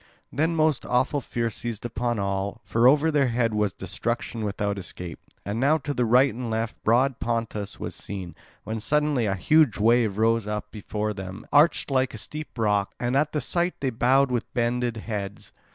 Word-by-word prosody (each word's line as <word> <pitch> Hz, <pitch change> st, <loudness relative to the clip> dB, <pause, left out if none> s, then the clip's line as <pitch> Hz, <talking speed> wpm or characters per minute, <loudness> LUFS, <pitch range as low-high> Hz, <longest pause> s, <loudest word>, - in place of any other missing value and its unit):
Then 160 Hz, +3 st, +1 dB
most 155 Hz, -3 st, +2 dB
awful 130 Hz, +3 st, +1 dB
fear 115 Hz, -2 st, -2 dB
seized 115 Hz, 0 st, -5 dB
upon 120 Hz, 0 st, -1 dB
all; 100 Hz, +2 st, -2 dB
for 115 Hz, +2 st, +3 dB
over 150 Hz, +4 st, +4 dB
their 145 Hz, -3 st, +3 dB
head 115 Hz, -2 st, +1 dB
was 105 Hz, -2 st, +1 dB
destruction 115 Hz, +4 st, -3 dB
without 100 Hz, -1 st, -2 dB
escape. 90 Hz, -1 st, -8 dB, 0.3 s
And 100 Hz, +4 st, -2 dB
now 145 Hz, +5 st, +4 dB
to 145 Hz, -1 st, -4 dB
right 125 Hz, +3 st, +4 dB
and 120 Hz, +1 st, -5 dB
left 110 Hz, 0 st, -3 dB
broad 125 Hz, +4 st, +3 dB
Pontus 115 Hz, -3 st, -2 dB
was -, -, -5 dB
seen, 95 Hz, -3 st, -7 dB, 0.3 s
when 110 Hz, +1 st, -4 dB
suddenly 145 Hz, 0 st, +1 dB
a 95 Hz, -, 0 dB
huge 150 Hz, -, +3 dB
wave 110 Hz, -1 st, +3 dB
rose 115 Hz, -1 st, +2 dB
up 105 Hz, 0 st, -4 dB
before 105 Hz, 0 st, -3 dB
them, 95 Hz, 0 st, -8 dB
arched, 150 Hz, 0 st, +4 dB
like 130 Hz, -3 st, +1 dB
a -, -, -6 dB
steep 150 Hz, +5 st, -8 dB
rock; 105 Hz, -3 st, +1 dB
and 120 Hz, +1 st, -1 dB
at 150 Hz, +2 st, +2 dB
the 150 Hz, -, -1 dB
sight 175 Hz, +7 st, 0 dB
they 135 Hz, -2 st, -1 dB
bowed 130 Hz, +3 st, +3 dB
with 125 Hz, -1 st, -2 dB
bended 120 Hz, -1 st, 0 dB
heads. 105 Hz, -3 st, -5 dB
115 Hz, 185 wpm, -25 LUFS, 105-135 Hz, 0.3 s, over